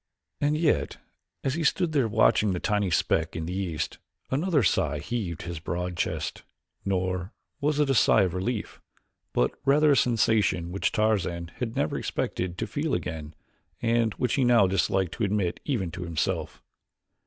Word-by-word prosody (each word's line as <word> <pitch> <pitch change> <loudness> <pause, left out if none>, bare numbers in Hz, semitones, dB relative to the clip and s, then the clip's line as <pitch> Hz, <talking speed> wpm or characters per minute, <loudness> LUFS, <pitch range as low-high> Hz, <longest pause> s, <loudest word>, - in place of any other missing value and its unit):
And 145 +1 +1
yet, 160 -1 +1 0.5
as 135 - 0
he 165 +3 -2
stood 170 +3 +2
there 140 -6 +2
watching 105 -1 +3
the 90 - -2
tiny 105 -1 0
speck 80 - +1
in 80 0 -3
the 90 - -4
east, 85 -5 -3 0.3
another 150 0 +2
sigh 85 -5 +1
heaved 85 +1 -4
his 85 -2 -5
broad 90 +2 -3
chest, - - -2 0.4
nor 95 0 -1 0.3
was 150 0 0
it 150 - +3
a 135 - +2
sigh 110 -4 +5
of 90 -3 -1
relief, 105 +4 -3 0.5
but 60 - +2
rather 150 +2 +4
a - - +5
sensation 105 -8 +2
which 95 - 0
Tarzan 95 -6 0
had 115 -2 -3
never 75 - 0
expected 90 -1 -3
to - - -2
feel 150 0 -1
again 80 -3 -5 0.4
and 115 -1 +1
which 125 -1 0
he 135 - +2
now 120 -5 +5
disliked 95 -1 +1
to 115 - -1
admit 100 -3 0
even 105 - -1
to 90 - -7
himself. 85 -4 -2
100 Hz, 165 wpm, -27 LUFS, 90-125 Hz, 0.5 s, sigh